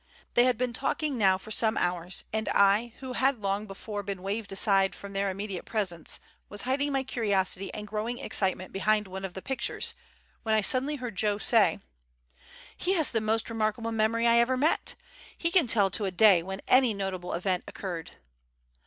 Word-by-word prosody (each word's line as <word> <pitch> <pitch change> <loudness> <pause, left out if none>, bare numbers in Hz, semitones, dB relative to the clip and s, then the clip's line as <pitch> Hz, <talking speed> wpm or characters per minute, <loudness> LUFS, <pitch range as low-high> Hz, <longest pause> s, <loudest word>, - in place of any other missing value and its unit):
They 240 - +5
had 250 -3 +2
been 250 0 -1
talking 280 +3 -1
now 195 -5 +3
for 205 +3 -12
some 220 0 +2
hours, 175 0 -1
and 220 0 -1
I, 205 +4 +3
who 260 -1 -6
had 265 +1 +2
long 200 +1 -2
before 205 +1 -6
been 195 -2 -6
waved 205 +2 -3
aside 195 0 +3
from 200 0 -10
their 195 0 0
immediate 195 -1 -5
presence, 185 -7 -2 0.3
was 205 0 -3
hiding 280 +3 0
my 270 -1 0
curiosity 200 -6 -1
and 210 - -6
growing 215 +3 -3
excitement 185 -4 -1
behind 210 +2 +1
one 190 +1 -7
of 190 -2 -6
the 190 - -7
pictures, 260 -3 -1 0.5
when 220 -2 +1
I 215 - +3
suddenly 265 +7 +3
heard 245 -7 -6
Joe 210 0 +1
say: 215 -2 +3 0.9
"He 370 - 0
has 320 -6 +2
the 225 - 0
most 220 +1 0
remarkable 225 0 -2
memory 225 +1 +1
I 235 0 +5
ever 255 +2 +2
met. 300 +5 +1 0.4
He 335 - -1
can 345 -8 +4
tell 205 -4 +3
to 205 +1 +1
a 190 - -1
day 185 -1 +6
when 190 +3 -6
any 255 -4 +4
notable 190 -2 -4
event 180 +1 -1
occurred." 175 -5 -6
215 Hz, 190 wpm, -28 LUFS, 195-235 Hz, 0.9 s, day